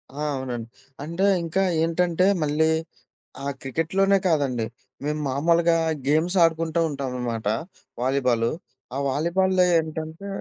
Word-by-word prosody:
ఆ! - - -10 0.2
అవునండి. 125 -4 -4 0.4
అంటే 170 +5 -1 0.2
ఇంకా 175 +4 0 0.2
ఏంటంటే 170 +2 +2 0.2
మళ్ళీ 150 +2 +2 0.7
ఆ - - -3
క్రికెట్‌లోనే 190 +8 +1
కాదండి 135 -8 +1 0.4
మేము 150 +1 -1
మామూలుగా 165 +4 +3 0.3
గేమ్స్ 160 +6 +2
ఆడుకుంటూ 165 0 +1
ఉంటావనమాట 125 -5 -3 0.5
వాలీబాలు. 125 -3 +1 0.4
ఆ - - -1
వాలీబాల్‌లో 180 +5 +2
ఏంటంటే 160 +4 -5
160 Hz, 105 wpm, -24 LUFS, 135-170 Hz, 0.7 s, మామూలుగా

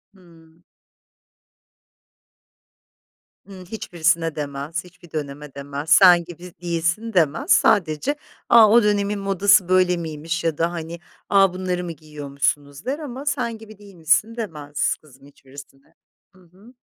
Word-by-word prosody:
Hımm. 165 -2 -21 2.8
Iıı, 190 -2 -11
hiçbirisine 170 -5 -1
demez, 145 +3 -5
hiçbir 180 -2 -18
döneme 145 -1 -6
demez, 140 +2 -6
"Sen 175 0 +7
gibi 175 +1 -11
değilsin." 170 +6 -2
demez. 165 -4 +1
Sadece, 170 - +3 0.3
"A, 225 -3 +7
o 235 0 +5
dönemin 205 0 0
modası 195 -1 +3
böyle 185 -1 +3
miymiş? 160 0 -4
ya 160 -3 -1
da, 165 +1 0
hani, 170 0 -7 0.3
"A, 195 -2 +4
bunları 180 -1 -3
mı 170 - -5
giyiyormuşsunuz?" 145 - -4
der 280 +4 -2
ama, 275 -2 -7
"Sen 250 -6 -2
gibi 215 -1 -14
değilmişsin." 200 +2 0
demez 150 - -3
kızım 135 -3 -20
hiçbirisine. 135 0 -16 0.4
Hı 185 - -21
hı. 190 +8 -20
170 Hz, 125 wpm, -22 LUFS, 155-200 Hz, 2.8 s, Sen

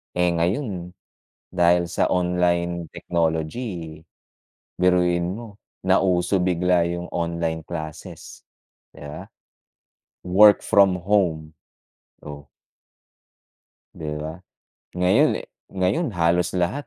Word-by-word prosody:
Eh, 90 0 +2
ngayon 90 - -2 0.6
dahil 85 -1 +2
sa - - +1
online 90 -1 0
technology, 80 0 -3 0.8
biruin 90 -1 +2
mo 110 -2 -10 0.2
nauso 95 0 +2
bigla 90 -1 +2
yung 85 +1 -4
online 85 -2 -3
classes, 80 -3 -8 0.5
‘di - - -13
ba. 75 +1 -8 1.0
Work 105 +3 +6
from 100 -2 +4
home, 85 -6 0 0.7
oh. 75 -1 -10 1.5
'Di 80 -4 -7
ba, 80 +1 -5 0.6
ngayon, 90 0 +4
eh - - -8 0.2
ngayon 95 - 0
halos 85 +1 +1
lahat 100 +11 -1
90 Hz, 95 wpm, -23 LUFS, 85-95 Hz, 1.5 s, Work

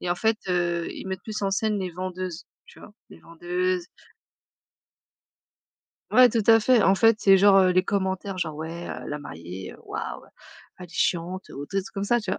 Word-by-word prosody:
et 180 - -3
en 175 - +1
fait, 220 +2 +1
heu, 175 -1 0
ils - - -8
mettent 190 0 -5
plus 215 -1 -5
en 195 -1 0
scène 210 +1 0
les 185 -2 -3
vendeuses, 185 -1 -5 0.2
tu - - -17
vois? - - -13 0.2
Les 80 - -15
vendeuses 180 - -2 2.2
Ouais, 255 0 +7
tout 230 -1 0
à 225 0 +7
fait, 240 0 +4
en 195 - +5
fait, 225 +2 +4
c'est 195 -2 +5
genre, 200 0 +6
heu, 185 -1 +5
les 185 - +3
commentaires 190 0 -2
genre: 160 -3 -2
«Ouais, 165 +2 -6
heu, - - -7
la 150 - -4
mariée, 90 - -8
heu, - - -14
waouh, - - -5 0.6
elle 180 - -8
est - - -26
chiante», 180 +2 -1
ou 140 +1 -8
tu 195 - -6
sais - - +4
des 195 - -3
trucs - - -13
comme 195 - -2
ça, 240 +3 +2
tu 210 - -5
vois? - - -2
185 Hz, 220 wpm, -25 LUFS, 175-200 Hz, 2.2 s, Ouais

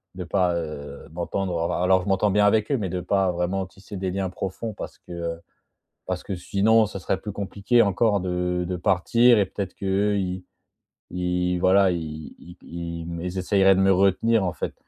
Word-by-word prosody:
de 90 - -5
pas, 90 -1 +1
heu, 75 -4 -6
m'entendre 85 0 -2
alors 95 +1 +3
je 90 - -8
m'entends 95 +1 +2
bien 105 +1 +4
avec 110 +3 +2
eux, 140 - +2
mais 100 -5 -3
de 90 +1 -3
pas 95 +1 +1
vraiment 90 +2 -2
tisser 95 +2 -12
des 95 -1 -2
liens 95 0 -2
profonds, 105 +5 -5
parce - - -8
que - - -16
heu, 85 -1 -4 0.7
parce 90 -1 -3
que 95 - -4
sinon, 105 +5 +3
ça 100 -2 -6
serait 90 - -1
plus 105 - -5
compliqué 100 +4 +1
encore 100 +1 +2
de 90 -1 -1
de 90 - -2
partir 105 +6 +4
et 100 - +3
peut-être 95 0 -5
qu'eux, 100 +1 0
ils 90 -1 -3 0.7
ils 90 0 -1
voilà 95 +2 +4
i 80 -3 -5
ils 90 +1 -14
ils 85 +1 -5
essayeraient 95 +1 +4
de 95 - +2
me 95 0 +5
retenir, 100 +3 +3
en 90 - -1
fait. - - -5
95 Hz, 190 wpm, -24 LUFS, 90-100 Hz, 0.7 s, me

